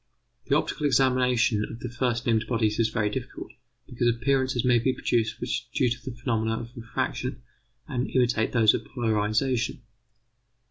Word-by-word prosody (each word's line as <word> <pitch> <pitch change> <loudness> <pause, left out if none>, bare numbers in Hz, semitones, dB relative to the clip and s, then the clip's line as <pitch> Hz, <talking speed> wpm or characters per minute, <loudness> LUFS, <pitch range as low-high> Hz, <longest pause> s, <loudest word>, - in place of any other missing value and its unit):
The - - +3
optical 150 - -1
examination 125 -4 +3
of 115 - -6
the - - -3
first 120 -1 -1
named 110 -1 +1
bodies 110 -2 0
is 115 -1 +3
very 105 -2 0
difficult, - - -6 0.3
because 120 0 -1
appearances 130 +1 +1
may 120 -1 +4
be 130 +3 +1
produced 115 -3 0
which - - -3
are - - -30
due 125 - +3
to 120 - -4
the 120 - -9
phenomena 115 -2 -1
of 120 +2 -9
refraction 125 +1 -3 0.4
and 125 -1 -2
imitate 120 -3 +1
those 110 -3 +5
of - - -2
polarization. 115 +1 0
120 Hz, 165 wpm, -26 LUFS, 115-125 Hz, 0.4 s, those